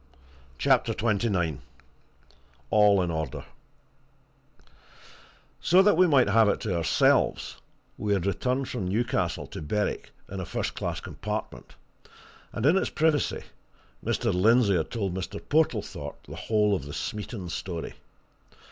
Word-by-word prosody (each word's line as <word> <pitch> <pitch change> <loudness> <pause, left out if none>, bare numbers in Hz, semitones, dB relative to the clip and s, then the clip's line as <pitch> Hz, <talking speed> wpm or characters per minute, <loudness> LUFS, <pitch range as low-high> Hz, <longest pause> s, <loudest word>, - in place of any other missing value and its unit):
CHAPTER - - +2
XXIX 100 - 0 1.1
ALL 105 -3 +5
IN 85 - -2
ORDER 80 -5 -4 2.1
So 185 +3 +5
that 205 -2 +5
we 180 +2 +5
might 140 -6 +4
have 115 -2 +5
it - - 0
to 100 -5 -2
ourselves, 85 -1 +2 0.4
we 105 -1 0
had 95 -3 0
returned 125 +7 -1
from 105 -7 -3
Newcastle 105 -4 -1
to - - -8
Berwick 105 +7 -2 0.2
in 100 - -6
a 95 - -4
first - - -3
class - - -4
compartment, - - -6 0.8
and 110 - -3
in 160 +6 +5
its 190 - 0
privacy 155 -2 +1 0.6
Mr. - - 0
Lindsey 105 +2 +4
had 80 -3 -1
told 100 -6 -2
Mr. 95 0 -5
Portlethorpe 155 +1 -1
the - - -9
whole 105 -2 +1
of 70 - -5
the 70 - -8
Smeaton 105 +2 -5
story. 85 -1 -5
105 Hz, 130 wpm, -27 LUFS, 90-120 Hz, 2.1 s, ALL